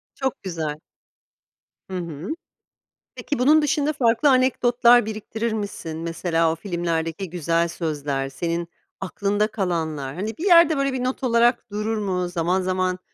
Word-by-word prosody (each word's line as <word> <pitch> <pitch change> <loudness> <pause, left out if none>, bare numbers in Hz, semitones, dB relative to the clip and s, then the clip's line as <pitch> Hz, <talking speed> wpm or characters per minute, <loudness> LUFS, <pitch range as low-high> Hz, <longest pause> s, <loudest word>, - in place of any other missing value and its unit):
Çok 265 -2 -3
güzel. 160 -5 -4 1.1
Hı 185 - -3
hı. 170 0 -6 0.9
Peki 290 - -3
bunun 305 +5 +5
dışında 295 +1 +1
farklı 245 +1 +3
anekdotlar 245 -2 +4
biriktirir 220 +1 -3
misin? 200 -7 -5
Mesela 165 0 0
o - - -2
filmlerdeki 170 0 -3
güzel 170 0 0
sözler, 145 -5 -3
senin 170 +4 -3 0.3
aklında 200 +2 0
kalanlar, 160 -9 -3
hani 215 +4 -4
bir 355 - -4
yerde, 335 -4 +6
böyle, 275 -1 0
bir 250 -1 -2
not 255 +1 -2
olarak 235 -2 +2
durur 215 +1 -2
mu? 185 -3 -1
Zaman 175 +2 0
zaman 185 0 -1
190 Hz, 135 wpm, -23 LUFS, 165-240 Hz, 1.1 s, yerde